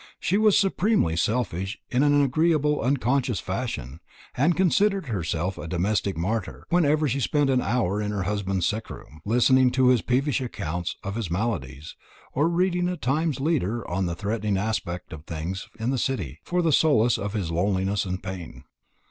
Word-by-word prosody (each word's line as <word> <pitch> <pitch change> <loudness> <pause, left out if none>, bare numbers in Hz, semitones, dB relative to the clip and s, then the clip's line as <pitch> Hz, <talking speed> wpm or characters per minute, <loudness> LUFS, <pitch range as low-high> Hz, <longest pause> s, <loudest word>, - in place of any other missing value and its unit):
She 185 - 0
was 215 -2 +5
supremely 195 - +2
selfish 95 0 -1
in 125 - +2
an 145 0 +4
agreeable 150 +1 +2
unconscious 125 -3 +1
fashion, 90 - -4 0.4
and 160 +7 +2
considered 195 +1 +2
herself 90 - -2
a 80 - -6
domestic 95 +2 0
martyr 100 +5 -3
whenever 155 -3 +3
she 135 +1 -1
spent 145 +1 +1
an 130 -1 +2
hour 105 -5 0
in 105 - -2
her 100 -2 -2
husband's 95 -2 -1
sick 110 +2 -2
room, 75 +2 -11
listening 125 +4 +4
to 130 -1 +4
his 125 -3 +4
peevish 135 +2 0
accounts 85 -8 -4
of 100 - -4
his 110 -5 -3
maladies, 80 - -3 0.4
or 150 +5 +2
reading 180 0 +1
a 180 - -3
Times 150 +2 0
leader 125 - -1
on 95 +1 -1
the 85 - -3
threatening 105 +1 -1
aspect 95 -5 -3
of 75 0 -10
things 85 +4 -5
in 115 +3 0
the 135 - 0
City 85 - -2
for 180 0 0
the 160 -2 +2
solace 120 -6 +4
of 100 0 -4
his 95 -7 -2
loneliness 95 +3 0
and 95 -1 -4
pain. 90 -10 -7
115 Hz, 175 wpm, -25 LUFS, 95-145 Hz, 0.4 s, was